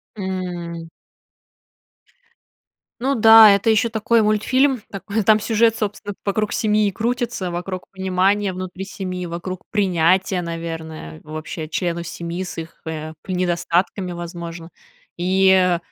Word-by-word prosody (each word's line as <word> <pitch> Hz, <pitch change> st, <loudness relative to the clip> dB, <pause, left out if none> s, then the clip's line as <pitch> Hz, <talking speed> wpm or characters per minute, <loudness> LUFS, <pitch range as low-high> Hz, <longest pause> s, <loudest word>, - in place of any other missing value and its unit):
М. 175 Hz, -4 st, -5 dB, 2.1 s
Ну 270 Hz, +3 st, +1 dB
да, 225 Hz, -2 st, +9 dB
это 200 Hz, +3 st, +1 dB
ещё 225 Hz, +2 st, +3 dB
такой 220 Hz, 0 st, +2 dB
мультфильм, 255 Hz, +4 st, +2 dB
такой 200 Hz, +2 st, -3 dB
там 215 Hz, +2 st, +5 dB
сюжет, 225 Hz, +1 st, +2 dB
собственно, 205 Hz, -1 st, -4 dB
вокруг 210 Hz, +1 st, 0 dB
семьи 210 Hz, -1 st, +2 dB
и -, -, 0 dB
крутится, 235 Hz, -4 st, -2 dB
вокруг 180 Hz, +1 st, -5 dB
понимания 190 Hz, +1 st, +1 dB
внутри 185 Hz, +1 st, -6 dB
семьи, 185 Hz, -3 st, -5 dB
вокруг 175 Hz, +2 st, -5 dB
принятия, 185 Hz, -2 st, +2 dB
наверное, 165 Hz, -, -6 dB
вообще 155 Hz, 0 st, -6 dB
членов 170 Hz, -1 st, -2 dB
семьи 170 Hz, +2 st, -5 dB
с 180 Hz, -, -8 dB
их, 165 Hz, 0 st, -8 dB
э, 155 Hz, 0 st, -5 dB
п 185 Hz, -, -5 dB
недостатками, 180 Hz, +1 st, 0 dB
возможно. 170 Hz, -1 st, -7 dB, 0.5 s
И 185 Hz, 0 st, +3 dB
185 Hz, 120 wpm, -21 LUFS, 170-210 Hz, 2.1 s, да